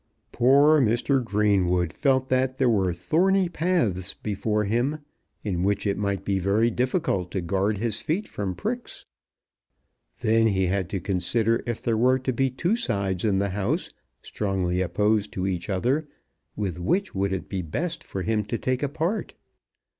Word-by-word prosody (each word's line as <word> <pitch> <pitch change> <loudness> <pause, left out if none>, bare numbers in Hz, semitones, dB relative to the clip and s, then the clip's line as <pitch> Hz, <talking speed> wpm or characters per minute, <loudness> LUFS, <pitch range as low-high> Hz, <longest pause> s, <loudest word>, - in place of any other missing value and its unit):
Poor 140 +5 +5
Mr. 125 +3 +2
Greenwood 95 -6 +1
felt 130 -2 +1
that 130 0 +1
there 130 - +2
were 100 -6 +2
thorny 180 - +2
paths 155 - 0
before 105 +1 -1
him, 120 +8 0 0.5
in 95 -5 -2
which 100 +2 0
it 100 - +1
might 100 -1 -2
be 100 -1 +1
very 105 +5 +2
difficult 120 - 0
to 95 - -2
guard 95 +4 0
his 110 0 -2
feet 185 +8 -1
from 95 -3 -4
pricks. 240 +4 -4 1.2
Then 115 +1 +3
he 95 -3 +1
had 95 -1 -1
to 95 - -2
consider 110 +6 +1
if 120 -1 -3
there 115 -2 +1
were 130 +2 +4
to 130 0 -2
be 135 +2 +1
two 170 - 0
sides 100 - -1
in 105 -3 +2
the 100 +1 0
house, 95 0 -2 0.3
strongly 95 -3 -1
opposed 105 +4 +1
to 95 - -2
each 90 -2 -2
other, 125 +11 0 0.5
with 95 -5 -3
which 185 - 0
would 100 0 0
it 95 -1 -3
be 95 -2 -3
best 160 - -3
for 95 - -5
him 110 0 0
to 115 - -2
take 130 +2 -1
a 145 - 0
part? 165 +9 -2
105 Hz, 170 wpm, -25 LUFS, 95-130 Hz, 1.2 s, Poor